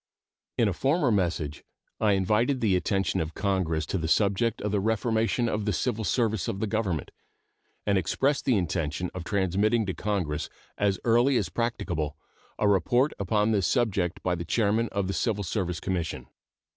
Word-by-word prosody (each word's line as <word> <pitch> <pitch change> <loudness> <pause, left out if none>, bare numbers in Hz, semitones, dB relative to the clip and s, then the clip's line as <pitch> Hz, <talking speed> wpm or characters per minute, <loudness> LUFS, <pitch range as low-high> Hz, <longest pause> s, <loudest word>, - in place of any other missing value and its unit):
In 115 - +3
a 100 - 0
former 135 - +1
message 85 -7 -1 0.4
I 105 -2 +3
invited 105 +8 +2
the 105 -6 +2
attention 95 +1 0
of 80 0 -5
Congress 90 -6 0
to 95 - -2
the 80 - -2
subject 105 +5 +2
of 105 - -1
the 105 - +1
reformation 110 +3 +1
of 105 -2 -1
the 105 - +1
civil 105 +7 -1
service 110 -3 0
of 95 - -3
the 110 - 0
Government, 100 - -2 0.7
and 100 -2 +3
expressed 135 - 0
the 125 -5 +3
intention 85 -2 -2
of 90 - -5
transmitting 100 +4 +1
to 95 - -2
Congress 90 -8 -2 0.3
as 100 -2 +1
early 120 +3 +4
as 95 -7 -1
practicable 85 -9 -2 0.4
a 105 - +2
report 120 +8 +3
upon 105 +2 +1
this 100 -5 +2
subject 95 -5 0
by 90 - +1
the 85 -1 -3
chairman 110 +4 +1
of 100 -1 -1
the 95 - -2
Civil 105 -2 0
Service 90 -2 -2
Commission. 90 -4 -3
100 Hz, 170 wpm, -27 LUFS, 90-110 Hz, 0.7 s, early